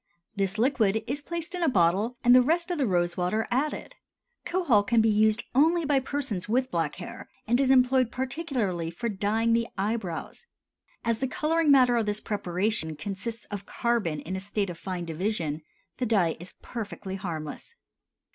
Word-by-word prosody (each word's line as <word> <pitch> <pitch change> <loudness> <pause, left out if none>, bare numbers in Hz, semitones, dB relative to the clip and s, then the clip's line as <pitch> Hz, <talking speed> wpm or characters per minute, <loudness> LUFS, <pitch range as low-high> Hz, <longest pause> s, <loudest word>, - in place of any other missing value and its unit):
This 195 0 -1
liquid 220 -4 +2
is 285 +3 -2
placed 340 +2 -5
in 360 - -3
a 330 - +3
bottle 200 +4 +2
and 245 0 +7
the 255 - +8
rest 340 +7 +1
of 345 - -2
the 270 - +2
rose 175 -2 +1
water 185 +5 0
added. 275 +5 -1 0.5
Kohol 340 - +3
can 230 +3 +2
be 220 0 +4
used 215 +1 +3
only 320 +5 +4
by 280 -1 +3
persons 260 -8 -3
with 255 +3 +1
black 165 -3 -1
hair, - - -9 0.2
and 240 +4 +2
is 265 - +2
employed 255 -1 +4
particularly 255 - -2
for 235 +8 -3
dyeing 215 +3 +1
the 230 0 +2
eyebrows. 200 - -3 0.6
As 230 -1 +1
the 265 - 0
coloring 320 +3 +1
matter 255 -3 +6
of 225 -2 0
this 210 0 +1
preparation 185 -5 -2
consists 205 +7 -5
of 205 -1 -6
carbon 210 -11 -1
in 185 +5 -5
a - - -2
state 200 0 -2
of 170 - -10
fine 180 -2 -4
division, 165 -2 -2 0.4
the 250 - -1
dye 190 -7 +2
is 175 +2 -9
perfectly 200 -4 -6
harmless. 170 - -6
220 Hz, 175 wpm, -27 LUFS, 190-260 Hz, 0.6 s, the